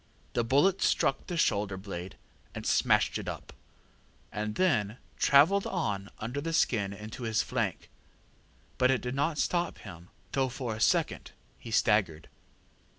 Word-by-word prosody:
The 120 - +1
bullet 145 +11 +3
struck 135 - +1
the 175 - -3
shoulder 100 - +1
blade 95 -2 -7 0.4
and - - -6
smashed - - +2
it - - -7
up, - - -8 0.8
and 105 0 -3
then 120 - +1 0.2
travelled 165 +8 +4
on 100 - -2
under 120 +6 -4
the 165 +2 -3
skin 105 -10 +1
into 105 +5 -8
his 110 -2 0
flank; 115 -8 -2 0.9
but 125 - +4
it 130 -2 +2
did 125 0 -4
not 145 +3 0
stop 175 +2 0
him, 85 +1 -11 0.2
though 135 -1 +1
for 125 -2 -4
a - - -8
second - - +1 0.3
he - - -10
staggered. 105 -8 +1
115 Hz, 150 wpm, -29 LUFS, 105-140 Hz, 0.9 s, travelled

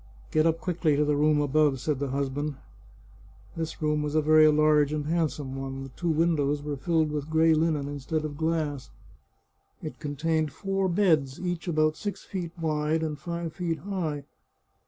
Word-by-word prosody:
" - - -23
Get 155 +1 +3
up 165 0 +1
quickly 170 -4 +1
to 150 +1 +2
the 150 0 +2
room 150 +1 +3
above," 145 -1 +2
said 145 +1 -1
the 140 - -1
husband. 140 +2 -2 1.0
This 160 -1 -4
room 150 0 +1
was 150 0 -2
a 155 - +4
very 155 0 +6
large 150 -1 +4
and 150 -1 -2
handsome 150 -4 -1
one. 135 0 -5
The 135 - -8
two 170 +7 -3
windows 150 -3 +1
were 145 -1 -3
filled 160 +2 +1
with 150 0 -3
gray 160 +1 +4
linen 155 -3 +1
instead 145 +2 -3
of 145 -1 -5
glass. 155 -3 -1 0.9
It 155 - -6
contained 155 +1 -1
four 195 +4 -1
beds, 160 -8 +2
each 175 -1 -3
about 155 -2 +2
six 205 -1 -5
feet 175 -4 -5
wide 155 0 0
and 150 -2 -3
five 170 +1 -4
feet 170 -3 -2
high. 165 -7 -3
155 Hz, 180 wpm, -27 LUFS, 145-165 Hz, 1.0 s, very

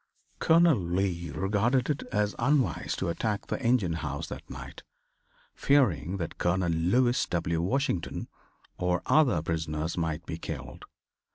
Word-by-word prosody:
Colonel 165 -5 +5
Lee 85 -1 -1
regarded 105 - +1
it 145 -2 -1
as 105 0 +1
unwise 135 +2 +1
to - - -2
attack 105 +4 -2
the - - -3
engine 115 -8 +2
house 75 -3 -4
that - - -8
night, - - -9 0.7
fearing 105 - +2
that 85 -3 -5
Colonel 90 0 +1
Lewis 120 +10 +2
W. 85 -1 -1
Washington 95 -3 -1 0.5
or 90 0 0
other 125 - +3
prisoners 80 0 -2
might 80 -2 -2
be - - -5
killed. - - -7
95 Hz, 130 wpm, -28 LUFS, 85-120 Hz, 0.7 s, Colonel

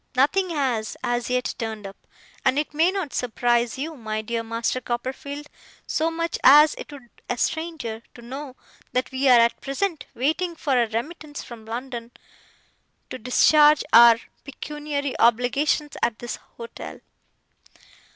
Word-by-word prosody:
Nothing 360 +9 +2
has, 260 -9 -1
as 240 0 -1
yet, 250 0 0
turned 220 -2 -4
up; 195 0 -11 0.4
and 265 - +2
it 300 0 -1
may 320 +4 +3
not 375 -9 -4
surprise 240 0 0
you, 310 +4 -4
my 215 -4 -4
dear 230 +1 -2
Master 230 +2 -2
Copperfield, 260 +4 -4 0.4
so 320 +1 0
much 335 0 -3
as 295 +3 +8
it - - -9
would 285 -3 -10 0.3
a - - -1
stranger, 315 -9 -3
to 240 - -12
know 265 +2 -7 0.4
that 255 +1 -1
we 265 +1 +1
are 245 -2 +8
at 235 0 +2
present 315 +5 -2
waiting 320 +7 0
for 295 -3 -1
a 240 -2 +3
remittance 290 +6 -5
from 225 -2 -11
London, 235 0 -5 1.0
to 255 - -6
discharge 295 +5 +5
our 235 0 +9 0.2
pecuniary 290 0 -4
obligations 260 +6 +2
at 235 -2 0
this 240 - -5 0.2
hotel. 235 0 -8
260 Hz, 145 wpm, -24 LUFS, 235-295 Hz, 1.0 s, our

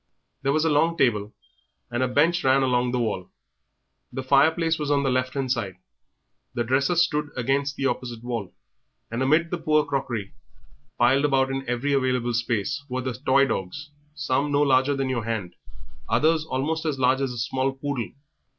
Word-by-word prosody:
There 140 - +1
was 155 +2 +1
a - - +3
long 165 +3 +2
table 105 -7 +1 0.6
and 120 +1 -1
a 130 - +2
bench 170 +7 +2
ran 135 +1 +4
along 125 -1 +1
the 125 - 0
wall. 105 -6 -2 0.8
The 130 +1 -5
fireplace 160 +5 +3
was 150 -1 -2
on 140 -1 +2
the 135 - +1
left 130 +1 -1
hand 135 -2 -1
side; 105 -7 -2 0.8
the 120 - 0
dresser 135 +8 +1
stood 150 -3 +1
against 135 +3 0
the 135 - -3
opposite 120 -3 -3
wall; 115 -6 -4 0.6
and 115 +2 -2
amid 155 +5 +2
the 175 - -2
poor 155 -1 +2
crockery, 130 -8 -3 0.6
piled 135 +4 +4
about 135 -2 +2
in 135 -1 -4
every 125 +4 0
available 125 -3 +1
space, 120 +4 -1
were 130 +1 -2
the 130 0 -3
toy 135 +2 +3
dogs, 140 +7 -4 0.2
some 140 0 0
no 145 +1 +3
larger 135 0 +3
than 135 -1 -1
your 125 -3 -1
hand, 110 -6 -3 0.6
others 160 0 +2
almost 155 +5 -1
as 155 -4 -1
large 130 +1 +2
as 135 -2 -1
a 120 - -7
small 130 +3 -1
poodle. 135 -3 -4
135 Hz, 180 wpm, -25 LUFS, 125-145 Hz, 0.8 s, ran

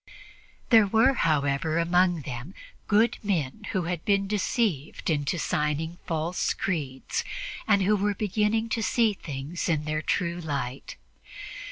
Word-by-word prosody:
There 220 -3 +7
were, 225 +7 +4
however, 155 - +1
among 175 0 +3
them 130 +7 -7 0.3
good 220 +3 +3
men 195 -1 -2
who 190 -3 0
had 170 -1 -3
been 200 -1 +2
deceived 200 - -1
into 145 +2 0
signing 155 +2 -1
false 165 +1 -1
creeds 140 -8 -2 0.4
and 200 -1 +4
who 210 +3 +3
were 205 0 0
beginning 215 +3 0
to 230 0 -1
see 225 0 +2
things 150 -1 -5
in 155 -2 +1
their 155 0 -1
true 170 +1 -1
light. 140 -4 -4
175 Hz, 135 wpm, -27 LUFS, 150-205 Hz, 0.4 s, There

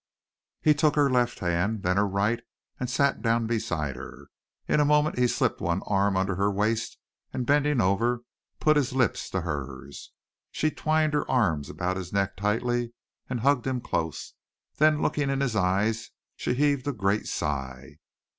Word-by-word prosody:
He 155 - +6
took 150 0 +2
her 145 -2 +3
left 120 -1 +1
hand, 90 +4 0
then 90 +1 +1
her 105 0 +3
right 100 +4 0 0.4
and 125 - -2
sat 140 +3 +1
down 115 0 +1
beside 85 - -2
her. 70 +1 -10 0.4
In - - +2
a - - +5
moment 150 -1 +2
he 125 - +4
slipped - - 0
one 85 +2 -1
arm 100 -1 +1
under 95 +1 +1
her 100 +1 +2
waist 110 +3 -1 0.3
and 125 - -3
bending 145 0 +2
over 115 +5 +1 0.4
put 155 -1 +4
his 135 -3 0
lips 115 -7 0
to 95 - -2
hers. 70 -4 -6 0.4
She 155 - 0
twined 155 0 +1
her 150 - 0
arms 85 - +1
about 90 +1 -2
his 90 -2 -6
neck 100 -1 0
tightly 120 +4 -1 0.4
and 125 -3 -2
hugged 135 0 +2
him 130 -1 0
close; 80 - -3 0.4
then 155 0 +4
looking 145 -2 0
in 135 0 0
his 130 -5 0
eyes 105 +4 +1 0.3
she 125 - -2
heaved 145 -1 +1
a 145 - 0
great 100 -1 0
sigh. 65 0 -4
110 Hz, 175 wpm, -27 LUFS, 95-135 Hz, 0.4 s, He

